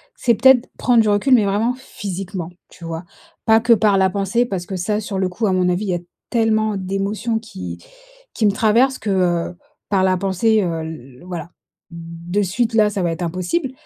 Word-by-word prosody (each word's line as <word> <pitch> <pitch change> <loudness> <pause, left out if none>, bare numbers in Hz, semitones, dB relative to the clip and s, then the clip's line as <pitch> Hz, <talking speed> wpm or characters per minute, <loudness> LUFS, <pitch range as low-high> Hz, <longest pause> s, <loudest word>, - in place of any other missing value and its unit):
c'est 235 -3 +2
peut-être 265 -1 +5
prendre 240 -2 +4
du 215 - +1
recul, 205 +6 +3
mais 215 - +3
vraiment 210 +5 +1
physiquement, 195 -7 -6 0.2
tu 175 - -16
vois? 165 +1 -5 0.4
Pas 220 -1 +5
que, 235 +1 +4
par 210 -2 +3
la 190 0 +3
pensée 200 +5 0
parce 190 -6 -4
que, 190 - -5
ça 210 +4 -1
sur 200 -2 -4
le 185 -1 0
coup, 215 +4 -1
à 190 - +1
mon 180 -1 +2
avis, 180 +4 -1
il - - -3
y 180 - +1
a 175 - -2 0.3
tellement 220 -2 +1
d'émotions 200 +4 -2
qui 90 - -8 0.6
qui 220 - 0
me 205 - +5
traversent 230 +6 +2
que, 210 - -4
heu, 175 -2 0 0.3
par 195 -2 +2
la 185 -1 +3
pensée, 200 +3 +2
heu, 165 -2 -2
l 135 -4 -9
voilà. 175 -2 -6 0.4
De 170 +3 -4
suite 225 +5 -1
là, 215 -2 +4
ça 200 -2 -3
va 170 - +1
être 165 - -5
impossible. 185 - -2
195 Hz, 210 wpm, -20 LUFS, 180-220 Hz, 0.6 s, peut-être